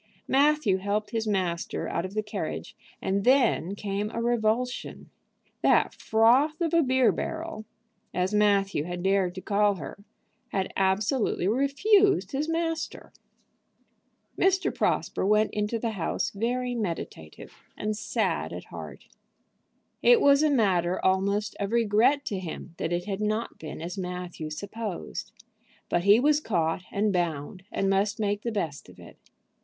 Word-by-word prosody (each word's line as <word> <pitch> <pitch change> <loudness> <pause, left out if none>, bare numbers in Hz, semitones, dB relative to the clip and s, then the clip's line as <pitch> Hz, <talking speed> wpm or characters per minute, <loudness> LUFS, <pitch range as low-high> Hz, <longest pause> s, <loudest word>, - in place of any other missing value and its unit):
Matthew 280 -7 +3
helped 205 +2 -2
his 225 -2 -2
master 185 -5 -1
out 170 - -2
of 190 +2 -8
the 215 - 0
carriage, 210 - -5 0.3
and 195 +1 0
then 240 -7 +3
came 205 +1 -3
a 230 - -4
revulsion. 240 +1 -1 0.5
That - - +3
"froth 250 +8 +3
of 340 -1 -1
a 335 - +5
beer 260 -3 +3
barrel," 325 -9 -5 0.5
as 185 +2 -1
Matthew 200 -6 +2
had 175 0 -5
dared 190 -2 +1
to 185 - -6
call 205 0 +2
her, 180 +4 -9 0.4
had 190 -1 -2
absolutely 195 +2 +1
refused 370 - +3
his 295 +3 -2
master. 330 0 -3 1.2
Mr. 380 0 +2
Prosper - - 0
went 210 +2 +3
into 210 +2 -1
the 230 0 -2
house 195 +1 -2
very 245 +4 -1
meditative, 170 - -5 0.2
and 215 0 -2
sad 220 - -1
at - - -6
heart. - - -10 0.9
It 485 -2 +6
was 280 -5 +5
a 310 - +4
matter 185 -9 +2
almost 200 +2 +1
of 200 +1 -2
regret 235 +5 +3
to 195 - -2
him 175 -1 -7
that - - -2
it 175 0 -1
had 200 0 -3
not 215 +2 -2
been 160 0 -7
as 180 +4 -5
Matthew 180 -3 -5
supposed. 200 +3 -6 0.6
But 175 +1 0
he 205 +3 +7
was 295 +3 +3
caught 175 - -1
and 205 0 +1
bound, 175 +1 -2
and 195 - 0
must 200 +3 +1
make 205 -1 0
the 235 - -3
best 165 -9 -4
of - - -16
it. - - -14
210 Hz, 150 wpm, -27 LUFS, 190-245 Hz, 1.2 s, he